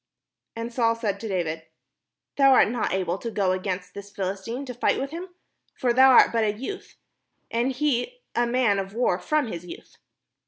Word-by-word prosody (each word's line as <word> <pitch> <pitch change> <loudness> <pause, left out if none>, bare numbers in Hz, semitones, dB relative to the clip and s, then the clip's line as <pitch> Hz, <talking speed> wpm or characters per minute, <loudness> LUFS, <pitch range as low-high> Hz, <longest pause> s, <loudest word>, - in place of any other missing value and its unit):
And 230 +1 -5
Saul 230 -2 +2
said 210 -4 -2
to 225 - -5
David: 165 -5 -3 0.7
"Thou 275 -1 +6
art 250 - +5
not 235 0 -1
able 185 -1 -1
to 235 - -4
go 200 -4 0
against 185 -1 -3
this 200 0 -9
Philistine 200 +6 -4
to 250 - -6
fight 245 - +1
with 275 +1 -4
him: 345 +3 -6 0.5
for 245 -2 +1
thou 260 +2 +7
art 255 - +7
but 230 -1 +1
a 210 -1 +1
youth, 330 - -7 0.6
and 240 +3 +1
he 300 - -1
a 240 0 +1
man 235 -5 +2
of 195 +1 -6
war 225 -6 +1
from 300 +10 0
his 175 -7 -6
youth." 175 - -12
230 Hz, 190 wpm, -25 LUFS, 195-255 Hz, 0.7 s, thou